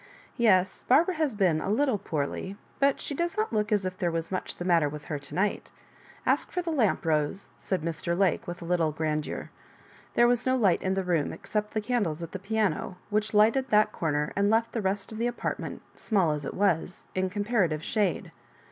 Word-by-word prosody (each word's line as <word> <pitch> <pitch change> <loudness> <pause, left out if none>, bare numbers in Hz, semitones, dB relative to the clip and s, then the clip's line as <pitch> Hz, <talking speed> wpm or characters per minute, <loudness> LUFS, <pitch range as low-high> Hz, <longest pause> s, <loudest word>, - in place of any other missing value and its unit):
Yes, 190 -5 +3
Barbara 325 +8 +5
has 310 -8 -1
^n 180 -6 +2
a - - -2
little 230 0 +2
poorly 170 +3 -3
— - - -31
^but 275 0 +3
she - - -2
does 340 +6 -2
not 435 - 0
look 210 0 0
as 205 -3 +2
if 185 0 -4
there 175 - +1
was 165 +1 -3
much 185 - -3
the 175 - -5
matter 165 -5 +3
with 150 0 -8
her 150 - -3
to 140 0 -7
night 200 +3 0 0.6
Ask - - +1
for 360 - -2
the 335 - -2
lamp, 230 - +1
Rose," 155 +4 0
said 185 -5 -3
Mr. 170 +1 -2
Lake, 190 -3 +1
with 175 0 -6
a - - -7
little 165 -2 +1
grandeur. 155 0 -3 0.6
There 240 - +6
was 245 0 +2
no 260 0 +2
light 205 -8 +3
in 190 0 0
the 195 - 0
room 170 -5 0
ex - - -12
cept 210 +1 -1
the 215 - +1
candles 205 -9 -1
at 165 - -7
the 190 - -5
piano, 200 -2 -1
which 215 +1 0
lighted 230 +6 +4
that 210 0 +4
comer 150 -4 -1
and 200 0 +2
left 225 +1 +2
the 225 - -2
rest 195 +1 -1
of 220 - -7
the 235 - +1
apartment, 240 - -4
small 190 -8 +1
as 150 -2 -3
it - - -5
was, 180 -3 0
in 185 0 0
comparative 200 -6 0
shade. 205 -5 0
195 Hz, 220 wpm, -28 LUFS, 170-220 Hz, 0.6 s, There